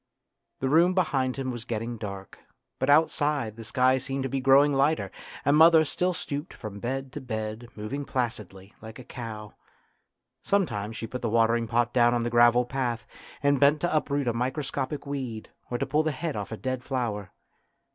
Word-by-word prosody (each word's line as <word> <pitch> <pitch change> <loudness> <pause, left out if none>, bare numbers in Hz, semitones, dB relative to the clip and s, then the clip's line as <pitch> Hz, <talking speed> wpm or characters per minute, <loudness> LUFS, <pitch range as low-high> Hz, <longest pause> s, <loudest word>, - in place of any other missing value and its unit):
The 135 - +1
room 170 +5 +4
behind 135 -8 +1
him 130 -1 -2
was 120 -2 -6
getting 115 0 -4
dark, 100 -3 -8 0.4
but 130 - 0
outside 145 -6 +2
the 115 - -9
sky 130 +3 +2
seemed 135 +1 -3
to 135 - -2
be 135 - -1
growing 135 +2 +5
lighter, 140 +3 +1 0.3
and 140 - +4
mother 160 0 +7
still 180 +5 0
stooped 145 -2 -5
from 100 -2 -8
bed 130 +3 -4
to 150 - -6
bed, 110 -1 -5
moving 120 +7 -4
placidly, 105 -7 -4
like 110 +1 -10
a 130 - -10
cow,. 110 -4 -8 0.9
Some 200 -1 +2
times 105 -3 -5
she - - -4
put 125 +2 -6
the 120 - -1
watering 115 +1 +2
pot 120 +1 +1
down 120 -1 +4
on 120 - 0
the 120 - -2
gravel 120 +1 +5
path, 120 -2 -2 0.4
and 140 -1 +3
bent 145 +2 +5
to 175 -2 0
uproot 145 -3 0
a 120 - +2
microscopic 135 +3 -3
weed 130 -6 -5 0.2
or 120 - -1
to - - -1
pull 150 +3 +2
the 155 0 0
head 155 +2 -4
off 105 0 -5
a 110 - -4
dead 130 +1 -3
flower. 115 -8 -3
125 Hz, 190 wpm, -27 LUFS, 115-140 Hz, 0.9 s, mother